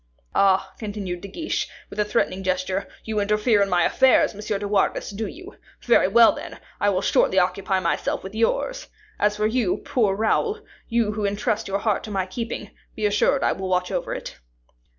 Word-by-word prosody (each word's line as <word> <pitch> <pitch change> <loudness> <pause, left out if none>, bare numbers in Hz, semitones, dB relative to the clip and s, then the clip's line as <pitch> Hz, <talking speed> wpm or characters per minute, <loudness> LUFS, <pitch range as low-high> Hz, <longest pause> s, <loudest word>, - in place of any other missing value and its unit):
Ah!" 195 -1 +3
continued 200 -5 -5
De 200 - -7
Guiche, 320 - -3 0.2
with - - -7
a - - +4
threatening 190 -2 0
gesture, 185 +1 -1 0.2
"you 220 -1 -2
interfere 210 +1 +2
in 200 - +2
my 175 -2 +3
affairs, 265 +8 +4
Monsieur 210 0 -3
de 205 +1 -4
Wardes, 200 0 0
do 210 +2 -4
you? 370 - -11 0.3
Very 235 -5 +4
well, 230 +3 +6
then; - - -8 0.2
I 205 - +3
will 190 -1 0
shortly 190 - +2
occupy 190 +1 +1
myself 170 -2 -1
with 190 +1 -8
yours. - - -1 0.3
As 210 0 +2
for 210 - +1
you, 220 -3 +1
poor 210 -6 0
Raoul, 420 - 0 0.3
you 230 -3 +1
who 210 0 -4
intrust 205 +1 -1
your 195 0 0
heart 205 0 0
to - - -8
my 195 -3 -1
keeping, 210 +1 -5 0.2
be 215 - -2
assured 210 +7 +2
I - - +3
will 190 -1 -4
watch 180 0 0
over - - -2
it." - - -8
205 Hz, 190 wpm, -23 LUFS, 190-220 Hz, 0.3 s, well